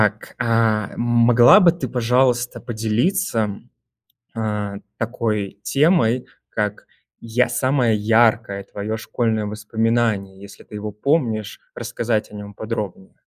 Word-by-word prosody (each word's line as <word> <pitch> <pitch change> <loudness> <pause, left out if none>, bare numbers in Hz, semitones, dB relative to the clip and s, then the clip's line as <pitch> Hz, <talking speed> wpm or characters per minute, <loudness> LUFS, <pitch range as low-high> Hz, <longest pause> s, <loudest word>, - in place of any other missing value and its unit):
Так, 105 0 0
а, 115 -3 +1
могла 120 - +6
бы 180 -4 +6
ты, 170 +1 -5
пожалуйста, 125 0 +1
поделиться, 115 - -1 0.8
э, 105 -2 -3 0.2
такой 110 -4 -2
темой, 135 - +2 0.2
как 105 -1 -3 0.3
я 115 +2 +1
самое 125 -1 +1
яркое 110 -2 +2
твое 105 +3 -5
школьное 110 -1 -1
воспоминание, 105 -2 -1
если 100 0 -13
ты - - -15
его 105 0 -4
помнишь, 110 -2 -1 0.2
рассказать 115 -2 -2
о - - -11
нём 105 0 -9
подробнее? 105 -4 -5
110 Hz, 115 wpm, -21 LUFS, 105-120 Hz, 0.8 s, могла